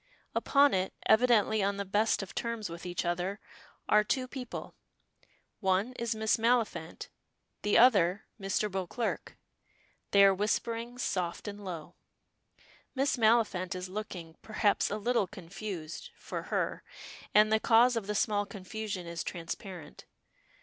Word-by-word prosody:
Upon 280 0 +4
it, 185 0 -1
evidently 220 -2 +4
on 200 +1 0
the 200 - -3
best 205 +2 +1
of 190 - -9
terms 230 -5 -3
with 170 +1 -7
each 175 0 -2
other, 180 +4 -1 0.5
are 210 0 +5
two 255 +4 -1
people. 250 -2 -7 0.9
One 190 +6 +1
is 235 -2 -2
Miss 220 0 +2
Maliphant, 230 -8 0 0.5
the 210 - +3
other 205 -5 +5 0.2
Mr. 195 +2 0
Beauclerk. 195 +5 -3 0.7
They 200 0 +6
are 195 - +6
whispering 230 +4 -2
"soft 180 -6 -2
and 205 0 -6
low." 170 -5 -7 1.0
Miss 270 +1 +2
Maliphant 215 -6 +2
is 180 0 -5
looking, 185 -5 -6
perhaps, 215 -1 +1
a 205 - -2
little 225 -2 +1
confused 180 -3 -7
for - - -6
her - - -1 0.5
and 215 +1 +6
the 220 - +4
cause 235 +3 +5
of 220 -4 -2
the 210 - -2
small 205 -1 +1
confusion 200 -1 -5
is 170 -1 -4
transparent. 170 -1 -7
205 Hz, 135 wpm, -31 LUFS, 185-225 Hz, 1.0 s, They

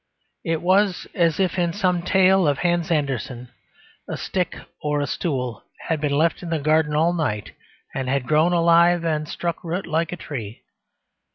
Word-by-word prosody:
It 165 0 -2
was 190 +1 +2
as 170 -3 +1
if, 185 -1 +1
in 170 -1 +1
some 180 -3 +1
tale 190 0 +4
of 145 -2 +2
Hans 175 0 0
Andersen, 130 -5 -2 0.6
a - - -3
stick 180 -3 -2 0.3
or 150 -1 0
a 145 - 0
stool 130 -7 -3 0.3
had 160 -2 0
been 145 -2 0
left 160 +1 +1
in 175 - -6
the 165 - 0
garden 155 0 +2
all 165 +3 +3
night 130 - -2 0.4
and 130 -1 -3
had 135 -1 0
grown 155 +3 +3
alive 170 0 +4
and 155 -2 -1
struck 170 -1 -3
root 175 +3 -3
like 165 0 -1
a 180 - -5
tree. 115 -9 -7
165 Hz, 175 wpm, -23 LUFS, 145-175 Hz, 0.6 s, tale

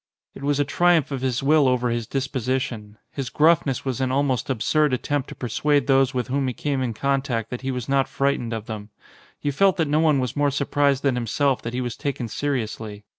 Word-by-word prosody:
It - - -11
was 145 0 0
a 145 - +2
triumph 175 -1 +2
of 135 -2 -3
his 130 -1 -1
will 150 0 +4
over 125 -1 +1
his 115 -2 -2
disposition. 130 -5 -3
His 135 -4 -4
gruffness 150 -3 +2
was 130 -1 -2
an 130 -1 0
almost 135 -3 0
absurd 145 +4 +1
attempt 145 +2 -1
to - - -8
persuade 145 +3 +1
those 135 -1 +3
with 125 -3 -2
whom 135 +1 0
he 125 - -3
came 140 -3 -1
in 120 -3 -2
contact 135 -4 -1
that 125 - -4
he 135 - -3
was 125 -3 -3
not 135 -1 +2
fright 140 +1 0
ened 120 -1 -5
of 110 -2 -4
them. 110 -2 -7 0.5
You 145 - +1
felt 195 +6 +3
that 160 -3 +1
no 150 +2 +2
one 155 -3 +4
was 125 -2 -2
more 145 -1 +2
surprised 140 0 +1
than 140 -2 +2
himself 125 +3 0
that 115 +1 -5
he 130 - -1
was 120 -2 -3
taken 135 -4 -3
seriously. 110 -6 -3
135 Hz, 225 wpm, -23 LUFS, 120-145 Hz, 0.5 s, will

